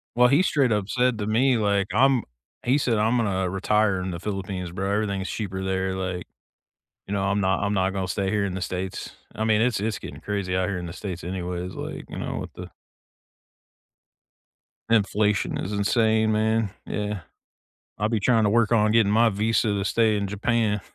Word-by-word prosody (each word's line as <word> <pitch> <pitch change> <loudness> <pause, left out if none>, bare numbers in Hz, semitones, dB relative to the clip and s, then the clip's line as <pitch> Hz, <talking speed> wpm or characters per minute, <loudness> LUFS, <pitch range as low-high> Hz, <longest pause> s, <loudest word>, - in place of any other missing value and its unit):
Well, 125 +1 +6
he 140 +7 +4
straight 140 -9 +2
up 105 -2 0
said 125 0 +2
to 105 - -2
me 125 +4 +3
like, 100 -2 +1
"I'm" 135 -2 +4 0.4
he 130 +3 +3
said 120 -6 +1
"I'm 110 +3 +2
gonna 95 -5 0
retire 100 +1 +1
in 90 0 -3
the 85 - -5
Philippines, 95 -2 -4
bro, 95 +2 -2
everything 100 -2 0
is 95 - -4
cheaper 95 -3 -4
there, 95 0 -1
like 90 -2 -3 0.8
You 100 - -3
know, 100 -1 0
I'm 100 +1 +1
not 95 0 +1
I'm 100 +1 0
not 95 -1 +1
gone 95 -1 -2
stay 95 +1 -1
here 105 0 +1
in 95 - -3
the 95 - -4
States." 90 +1 -4 0.2
I 110 - -2
mean, 110 -1 +3
it's 120 -2 +2
it's 110 +1 -2
getting - - -9
crazy 100 -3 -2
out 95 0 +1
here 95 -2 -2
in 90 - -6
the 85 - -6
States 95 -3 -6
anyways, 90 0 -4
like, - - -6
you - - -7
know, - - -4
with - - -7
the - - -9 2.2
Inflation 105 -2 +2
is 95 - -4
insane, 110 +1 +2
man, 110 0 +1 0.2
yeah. 105 -1 -3 0.8
I'll 105 +1 0
be 115 -1 +1
trying 115 +2 +3
to 105 - +3
work 115 +1 +3
on 105 -1 +4
getting 110 -2 +4
my 115 +2 +5
visa 110 +2 +1
to 100 -1 -1
stay 110 0 +2
in 100 -1 -1
Japan. 105 0 0
105 Hz, 200 wpm, -25 LUFS, 95-110 Hz, 2.2 s, Well